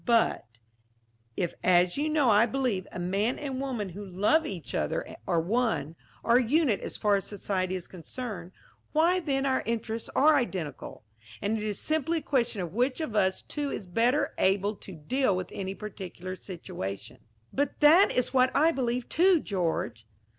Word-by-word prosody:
"But 230 - +2 0.9
if, 175 - -1
as 180 -1 +4
you 295 +2 0
know 295 -6 +3
I 210 +3 +5
believe, 235 -6 -1
a - - -7
man 195 +7 0
and 270 -3 -4
woman 245 -8 -3
who 195 +4 -8
love 205 - +2
each 180 -5 -6
other - - -2
are 170 - +2
one, 205 - 0 0.3
are 235 +1 +5
a 255 - +3
unit 260 -3 +2
as - - -6
far 205 -1 +3
as 195 - -5
society 190 -2 -2
is 180 -2 -5
concerned, 185 0 -7 0.4
why 335 +4 +4
then 275 -5 -1
our 260 -1 +1
interests 230 0 -3
are 305 +2 +6
identical, 180 - -4 0.4
and 205 +2 -1
it 215 - -3
is 210 -2 -2
simply 315 +2 0
a - - -2
question 240 -8 0
of 170 -1 -6
which 250 +6 +1
of 310 -9 -4
us 190 -2 +2
two 290 -1 -3
is 210 - -5
better 235 +10 +1
able 200 +2 +2
to 190 - -11
deal 205 - 0
with 185 0 -4
any 195 0 -4
particular 185 -3 -7
situation." 125 - -7 0.3
"But 285 +1 -1
that 320 +6 +7
is 250 +1 0
what 255 -1 +5
I 315 +3 +5
believe, 250 -4 -2
too, 360 +1 +4
George." 165 - -2
220 Hz, 175 wpm, -28 LUFS, 185-270 Hz, 0.9 s, that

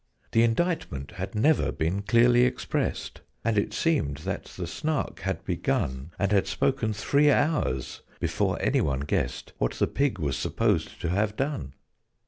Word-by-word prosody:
The 115 - +4
indictment 115 - 0
had - - -6
never 145 +8 +3
been 85 +5 -1
clearly 120 +3 +5
expressed, 125 0 -1 0.2
And 115 -1 +2
it 100 - +1
seemed 145 - +1
that - - -3
the 90 - -6
Snark 150 - -2
had 95 +3 -3
begun, 85 - -1
And 100 -1 0
had 100 -2 +3
spoken 130 -5 0
three 140 +9 +3
hours, 145 - +1 0.2
before - - 0
any - - +2
one 70 -1 0
guessed 75 - -2
What - - +1
the - - +1
pig 140 -7 0
was 70 -6 -1
supposed - - 0
to - - -1
have 105 +4 0
done. 135 - -2
105 Hz, 155 wpm, -27 LUFS, 80-135 Hz, 0.2 s, clearly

